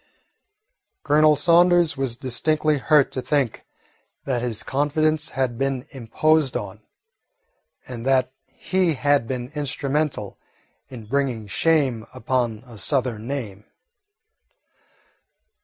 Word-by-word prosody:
Colonel 150 +1 +4
Saunders 170 +1 +4
was 135 -4 -2
distinctly 150 +4 0
hurt 150 +1 +3
to 130 - -3
think 140 -4 -1 0.6
that 125 -3 -1
his 120 -3 -3
confidence 155 +3 0
had 130 -5 -2
been 135 -2 -1
imposed 140 +3 +1
on, 105 +1 -8 1.1
and 120 -2 -7
that 130 0 +2 0.2
he 185 -4 -1
had 145 -3 +1
been 125 0 -5
instrumental 145 -5 -2 0.5
in 120 -4 -10
bringing 125 -2 -1
shame 130 -1 +1
upon 120 -2 -2
a 115 -4 -13
Southern 115 +1 -1
name. 110 -7 -5
135 Hz, 105 wpm, -23 LUFS, 120-150 Hz, 1.1 s, Colonel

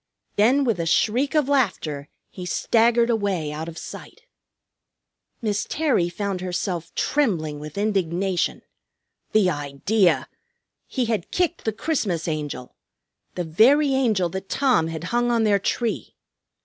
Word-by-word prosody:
Then 250 +7 +4
with 230 -8 0
a 165 - -1
shriek 250 - +2
of 300 -3 +3
laughter 185 - 0 0.2
he 185 - -8
staggered 235 +5 +2
away 195 -9 -1
out 155 +2 -5
of 165 - -10
sight. - - -9 1.2
Miss 210 -2 -1
Terry 275 - +1
found 195 0 -3
herself 180 -2 -3
trembling 165 - 0
with 150 +4 -9
indignation. 190 -3 0 0.7
The 200 -4 +4
idea! 145 +2 +1 0.6
He 255 -3 -1
had 220 -6 -2
kicked 350 -1 -1
the 220 - +1
Christmas 210 - -1
Angel, 150 -5 -4 0.6
the 180 - -2
very 265 - +4
Angel 220 -9 +2
that 190 +2 -6
Tom 255 - +2
had 165 0 -5
hung 240 0 +2
on 235 -2 +2
their 205 -2 +3
tree! 230 +4 -2
200 Hz, 135 wpm, -23 LUFS, 165-240 Hz, 1.2 s, Then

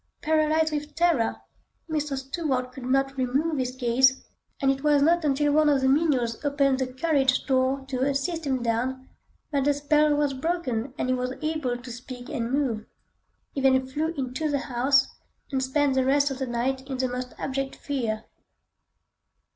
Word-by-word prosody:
Paralysed 315 0 +2
with 295 0 -4
terror, 335 -9 +2 0.5
Mr. 300 -3 -2
Stuart 265 -2 -2
could 255 -1 -9
not 270 +1 +1
remove 275 +4 0
his 255 0 -2
gaze, 260 +1 +3 0.3
and 270 -2 +3
it 270 +1 -4
was 295 -1 +4
not 340 +2 +3
until 290 0 +2
one 305 0 +4
of 280 -2 +3
the 265 - +2
menials 265 -5 +1
opened 280 -2 +2
the 255 -1 -2
carriage 265 -2 +1
door 265 0 +1
to 260 -2 -3
assist 280 +4 -1
him 260 -3 0
down, 255 +3 -1 0.4
that 280 -2 +1
the 290 0 +3
spell 300 +1 +3
was 290 -1 +1
broken 265 -5 -2
and 255 - -1
he - - +3
was 250 0 -2
able 310 -6 -1
to 245 0 -10
speak 245 +1 -9
and 240 -5 -3
move. 255 -6 -1 0.7
He 275 - -2
then 260 -1 +4
flew 290 +5 -2
into 270 +4 -2
the 285 - +1 0.2
house, 265 +3 +4 0.4
and 265 -1 0
spent 275 +1 +1
the 260 0 +2
rest 280 +2 +3
of 270 - -5
the 265 - -2
night 250 +3 -1
in 265 - -3
the 255 0 0
most 250 0 -5
abject 270 0 -3
fear. 230 -6 -3
270 Hz, 180 wpm, -26 LUFS, 255-295 Hz, 0.7 s, was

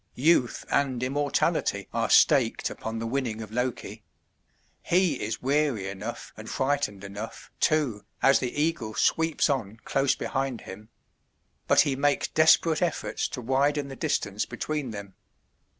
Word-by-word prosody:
Youth 130 -3 +2
and 130 -3 +1
immortality 140 +2 0
are - - 0
staked - - +4
upon 110 0 -5
the 115 - -3
winning 115 -2 -2
of 110 - -11
Loki. 125 +2 -3 0.8
He 175 -6 +1
is 110 +3 -4
weary 135 -7 +1
enough 95 -1 -7
and - - -9
frightened 130 -8 -1
enough, 100 +3 -8
too, 145 -10 +1 0.2
as 135 - +5
the 125 -2 -2
eagle 150 -9 -1
sweeps 160 -1 +2
on 115 -7 -2
close 135 0 +2
behind 135 -3 -3
him; 105 +3 -11 0.8
but - - +6
he 140 - 0
makes 145 +1 +1
desperate 160 +1 +4
efforts 175 -3 -1
to 125 - -6
widen 140 +3 +1
the 135 - -7
distance 100 -4 -1
between 150 -4 -3
them. 100 -3 -8
130 Hz, 140 wpm, -27 LUFS, 110-145 Hz, 0.8 s, but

